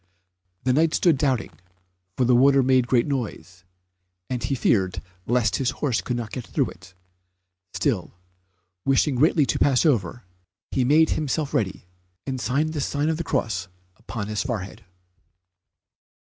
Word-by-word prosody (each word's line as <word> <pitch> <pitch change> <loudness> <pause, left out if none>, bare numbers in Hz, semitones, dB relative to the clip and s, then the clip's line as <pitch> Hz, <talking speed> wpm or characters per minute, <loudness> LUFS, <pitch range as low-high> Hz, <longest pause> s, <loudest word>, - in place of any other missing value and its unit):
The 125 - +2
Knight 155 +3 +2
stood 170 -4 +4
doubting, 130 -8 0 0.7
for 125 - +2
the 125 0 +4
water 135 +2 +5
made 130 -1 +3
a - - -15
great 120 -1 +3
noise, 95 - -5 0.7
and 125 -2 -2
he 135 +3 -1
feared 95 -7 +1 0.3
lest 115 -4 +2
his 130 -2 0
horse 130 -6 0
could 125 - -3
not 115 -3 -5
get 125 - -5
through 140 -4 -1
it. 95 +1 -16 0.8
Still, - - -1 0.7
wishing 135 +2 +2
greatly 150 +3 +3
to - - -1
pass 135 +2 +3
over, 120 - +1 0.5
he 130 - +1
made 155 +5 +4
himself 150 0 -1
ready, 95 -3 -1 0.4
and 130 -2 -3
signed 150 +6 0
the 150 - -2
sign 145 +2 -1
of 160 - 0
the 170 - -3
cross 110 - -2 0.3
upon 105 +2 -6
his 105 0 -2
forehead. 110 -4 -5
125 Hz, 155 wpm, -24 LUFS, 115-140 Hz, 0.8 s, water